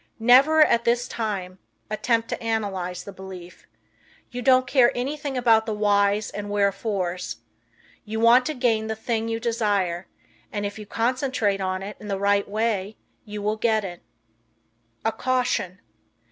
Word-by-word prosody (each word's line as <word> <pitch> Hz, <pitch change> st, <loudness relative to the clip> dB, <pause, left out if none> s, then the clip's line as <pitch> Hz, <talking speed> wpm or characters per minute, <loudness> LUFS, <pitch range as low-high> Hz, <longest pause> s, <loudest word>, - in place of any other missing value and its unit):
Never, 270 Hz, +7 st, +6 dB
at 235 Hz, -5 st, +2 dB
this 240 Hz, +1 st, +1 dB
time, 190 Hz, -5 st, -4 dB, 0.3 s
attempt 230 Hz, +1 st, 0 dB
to -, -, -4 dB
analyze 200 Hz, -6 st, -2 dB
the 200 Hz, -, -8 dB
belief. 185 Hz, -2 st, -11 dB, 0.6 s
You 245 Hz, -, -5 dB
don't 255 Hz, 0 st, +4 dB
care 250 Hz, -1 st, +4 dB
anything 280 Hz, +2 st, -3 dB
about 225 Hz, -2 st, +4 dB
the 215 Hz, -, -1 dB
whys 205 Hz, 0 st, +2 dB
and 205 Hz, 0 st, -6 dB
wherefores. 195 Hz, -, -1 dB, 0.7 s
You 220 Hz, 0 st, -4 dB
want 235 Hz, +4 st, +5 dB
to 310 Hz, -, -3 dB
gain 225 Hz, -3 st, +1 dB
the 220 Hz, -, -2 dB
thing 225 Hz, +1 st, -2 dB
you 225 Hz, 0 st, -2 dB
desire, 205 Hz, -7 st, 0 dB, 0.4 s
and 205 Hz, -1 st, -3 dB
if 205 Hz, +1 st, -5 dB
you 210 Hz, -, -9 dB
concentrate 230 Hz, -4 st, 0 dB
on 185 Hz, 0 st, -2 dB
it 205 Hz, +2 st, -7 dB
in 210 Hz, -, -10 dB
the 200 Hz, -1 st, -1 dB
right 200 Hz, 0 st, +1 dB
way 215 Hz, -1 st, -1 dB, 0.3 s
you 210 Hz, -1 st, -6 dB
will 210 Hz, +1 st, 0 dB
get 220 Hz, -1 st, +1 dB
it. 175 Hz, -2 st, -8 dB, 1.0 s
A 225 Hz, -, +3 dB
Caution. 250 Hz, -8 st, -1 dB
215 Hz, 155 wpm, -24 LUFS, 200-235 Hz, 1.0 s, Never